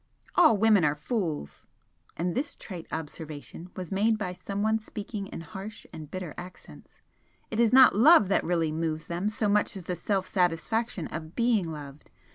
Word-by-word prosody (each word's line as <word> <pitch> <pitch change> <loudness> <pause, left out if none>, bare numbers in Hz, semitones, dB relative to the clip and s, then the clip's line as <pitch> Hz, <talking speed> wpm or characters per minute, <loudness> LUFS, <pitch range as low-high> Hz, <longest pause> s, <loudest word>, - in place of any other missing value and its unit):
"All 315 -11 +6
women 210 -3 +5
are 145 -1 +2
fools!" 155 - -4 0.5
and 175 +1 -1
this 285 +2 -2
trite 175 -5 -9
observation 160 +2 -7
was 185 -1 -6
made 215 +3 +2
by 190 -4 -3
someone 205 +4 -1
speaking 210 -1 -6
in 165 - -7
harsh 195 +6 -9
and 155 -2 -8
bitter 185 -3 -5
accents 180 +1 -12 0.6
"It 220 - -2
is 235 -2 +4
not 260 -3 +8
love 255 - +7
that 195 - +2
really 165 -2 0
moves 160 0 -2
them 175 +4 -2
so 215 0 -1
much 205 0 +1
as 185 - -8
the 180 - -2
self 190 +2 -1
satisfaction 180 +3 0
of 160 +1 -7
BEING 230 -8 +2
LOVED. 145 -1 -9
185 Hz, 170 wpm, -28 LUFS, 165-215 Hz, 0.6 s, not